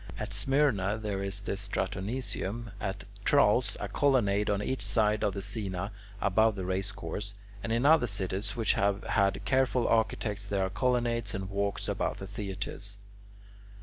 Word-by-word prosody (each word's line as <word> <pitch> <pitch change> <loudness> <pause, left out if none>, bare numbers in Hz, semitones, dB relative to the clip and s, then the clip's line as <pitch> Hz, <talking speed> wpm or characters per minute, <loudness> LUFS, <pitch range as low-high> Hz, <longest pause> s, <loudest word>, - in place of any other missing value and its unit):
At - - -4
Smyrna 125 -8 +2
there 105 -3 -3
is 100 0 -3
the 100 - -3
Stratoniceum, 100 +3 -3
at 100 0 -3 0.2
Tralles, 125 -3 +4
a - - -3
colonnade 105 -8 +2
on 100 0 +1
each 130 +2 -2
side 105 +2 +2
of 105 -2 +1
the 100 - -3
scaena 100 -2 -3 0.3
above 110 +2 +3
the 95 -2 -4
race 95 +2 0
course, 100 +2 -5 0.3
and 115 - -3
in 115 +4 +2
other 155 -4 +6
cities 100 0 -2
which 115 -3 +2
have 100 0 +1
had 100 0 +1
careful 130 -2 +2
architects 105 -2 +1
there 100 -1 +1
are 95 - -4
colonnades 120 0 +1
and 95 0 -4
walks 100 0 -1
about - - -1
the 95 - -6
theatres. 100 0 -5
105 Hz, 160 wpm, -30 LUFS, 100-115 Hz, 0.3 s, other